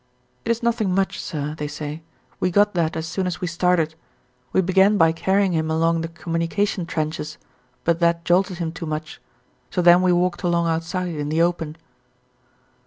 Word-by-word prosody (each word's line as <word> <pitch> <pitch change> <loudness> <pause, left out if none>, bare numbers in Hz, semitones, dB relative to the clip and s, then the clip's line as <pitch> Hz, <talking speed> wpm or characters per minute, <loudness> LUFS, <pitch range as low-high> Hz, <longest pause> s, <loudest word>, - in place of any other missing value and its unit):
"It - - -3
is 230 +1 0
nothing 225 -6 +1
much, 195 0 0
sir," 150 -2 -4
they 150 - -2
say, 150 +1 -6 0.4
"we 185 - +1
got 205 +3 +3
that 165 -3 0
as 160 - -3
soon 185 +2 -2
as 180 - -3
we - - -2
started. 170 -2 +1 0.6
We - - +3
began 190 +3 +4
by 165 -3 +5
carrying 190 +3 +1
him 160 -2 0
along 165 +1 +2
the 165 - -3
communication 170 +3 -2
trenches, 155 -2 -3 0.5
but 170 0 +1
that 170 0 +2
jolted 180 +1 +2
him 165 -2 -2
too 165 0 -7
much, 155 0 -5 0.5
so - - -3
then 175 +1 +7
we 185 -1 +3
walked 175 0 +1
along 170 -1 +1
outside 170 +2 -2
in 145 -1 -3
the 160 +2 +2
open." 165 -3 -1
170 Hz, 180 wpm, -22 LUFS, 160-185 Hz, 0.6 s, then